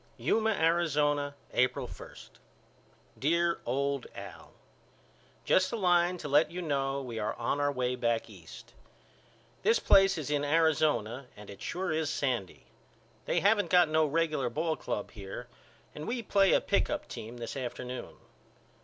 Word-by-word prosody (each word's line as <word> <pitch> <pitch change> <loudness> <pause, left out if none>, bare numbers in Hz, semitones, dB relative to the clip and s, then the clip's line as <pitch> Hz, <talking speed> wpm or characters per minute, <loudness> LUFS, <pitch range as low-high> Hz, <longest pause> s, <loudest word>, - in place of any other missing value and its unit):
Yuma, 220 0 +1
Arizona, 150 -6 +1 0.2
April 125 0 +1
1. - - -11 1.0
DEAR 170 +4 +1
OLD 140 +1 -1
AL: - - -10 0.9
Just 185 - +3
a - - -2
line 180 -3 +2
to 155 - -6
let 145 +3 +4
you 175 - -6
know 140 -4 -1
we 120 -3 -5
are 105 0 -2
on 145 - -1
our 145 0 +2
way 125 -2 -1
back 115 -2 0
East. - - -13 0.9
This 455 +2 +4
place 195 - +5
is 150 -2 -4
in 145 -1 +1
Arizona 145 -5 +1
and 105 -1 -10
it 100 0 -12
sure 180 0 -3
is 155 -1 0
sandy. 125 -12 -2 0.6
They 170 - +1
haven't 205 +2 +3
got 180 -3 +5
no 160 0 +3
regular 155 -4 0
ball 160 +6 -1
club 105 - -4
here 100 +2 -8 0.5
and 150 - -7
we 235 0 -2
play 195 -2 +3
a - - +4
pick - - +1
up - - -3
team 115 +3 -8
this 115 -1 -6
afternoon. 125 -1 -6
150 Hz, 155 wpm, -30 LUFS, 125-170 Hz, 1.0 s, place